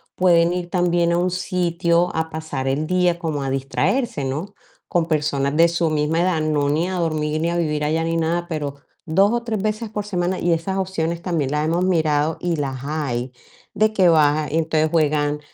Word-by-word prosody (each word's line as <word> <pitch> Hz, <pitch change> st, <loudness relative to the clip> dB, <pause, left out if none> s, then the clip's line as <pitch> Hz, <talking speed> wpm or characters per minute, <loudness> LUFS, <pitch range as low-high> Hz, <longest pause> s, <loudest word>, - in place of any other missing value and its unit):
pueden 175 Hz, -1 st, +4 dB
ir 180 Hz, -1 st, -4 dB
también 175 Hz, -1 st, +1 dB
a 170 Hz, -, +2 dB
un 180 Hz, +1 st, +1 dB
sitio 175 Hz, -1 st, 0 dB
a 160 Hz, 0 st, -1 dB
pasar 155 Hz, -4 st, -4 dB
el 150 Hz, +3 st, -1 dB
día 180 Hz, -1 st, +1 dB
como 155 Hz, -5 st, -2 dB
a 135 Hz, -, -2 dB
distraerse, 145 Hz, -, -1 dB
¿no?, 155 Hz, +10 st, -4 dB, 0.3 s
con 170 Hz, -2 st, +1 dB
personas 145 Hz, -3 st, 0 dB
de 165 Hz, +1 st, +6 dB
su 170 Hz, -1 st, 0 dB
misma 155 Hz, +2 st, +1 dB
edad, 175 Hz, -3 st, +1 dB
no 150 Hz, -2 st, +1 dB
ni 160 Hz, +5 st, +1 dB
a 185 Hz, -, -3 dB
dormir 155 Hz, -3 st, -1 dB
ni 170 Hz, -, +1 dB
a 175 Hz, -, -1 dB
vivir 150 Hz, -3 st, -1 dB
allá 160 Hz, +2 st, 0 dB
ni 165 Hz, -, -1 dB
nada, 170 Hz, +2 st, -1 dB
pero 145 Hz, -4 st, -4 dB, 0.3 s
2 195 Hz, +6 st, +3 dB
o 240 Hz, 0 st, -1 dB
3 220 Hz, -4 st, -2 dB
veces 215 Hz, +2 st, -2 dB
por 210 Hz, -1 st, -4 dB
semana 180 Hz, -2 st, -1 dB
y 175 Hz, -, +1 dB
esas 190 Hz, +4 st, -2 dB
opciones 170 Hz, -3 st, -2 dB
también 160 Hz, -7 st, -1 dB
las 150 Hz, +1 st, 0 dB
hemos 170 Hz, +3 st, +1 dB
mirado 160 Hz, -3 st, +1 dB
y 175 Hz, -2 st, 0 dB
las 135 Hz, -3 st, -3 dB
hay, 135 Hz, -5 st, -3 dB, 0.4 s
de 215 Hz, 0 st, +2 dB
que 190 Hz, -4 st, +4 dB
va, 150 Hz, -1 st, +3 dB
y 155 Hz, -, -1 dB
entonces 160 Hz, -1 st, +1 dB
juegan 150 Hz, -2 st, +1 dB
165 Hz, 205 wpm, -21 LUFS, 150-175 Hz, 0.4 s, de